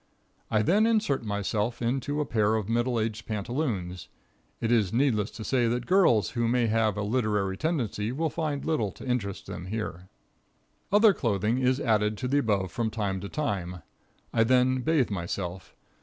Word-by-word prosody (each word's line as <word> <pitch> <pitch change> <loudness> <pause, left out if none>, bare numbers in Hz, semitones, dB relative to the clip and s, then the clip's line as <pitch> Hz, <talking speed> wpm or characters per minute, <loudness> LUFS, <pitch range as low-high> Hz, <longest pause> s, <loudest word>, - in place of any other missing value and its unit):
I 110 -1 +2
then 205 - +3
insert 215 - +1
myself 105 +2 -2
into 135 +5 -1
a - - -1
pair 110 -3 +1
of 110 -3 -2
middle 120 +1 +1
aged 110 0 -3
pantaloons. 105 - -3 0.5
It 115 - -1
is 110 -6 +3
needless 115 -5 +1
to 110 - -8
say 125 0 +1
that 120 +1 -1
girls 180 - +3
who 120 -1 0
may 120 0 +2
have 110 -2 +1
a 105 - -1
literary 105 -4 0
tendency 115 - -1
will 160 +4 -1
find 150 -4 -2
little 115 -11 0
to - - -11
interest 115 -7 -2
them 90 - -7
here. 95 -4 -5 0.8
Other 210 +1 +6
clothing 115 - 0
is 130 +1 +2
added 105 -2 +1
to 125 - -3
the 140 +3 +2
above 100 -8 0
from 115 +4 -1
time 100 -3 -2
to 100 - -6
time. 90 - -3 0.5
I 115 - +4
then 130 +2 +3
bathe 140 -4 +1
myself. 90 0 -4
115 Hz, 170 wpm, -27 LUFS, 105-130 Hz, 0.8 s, Other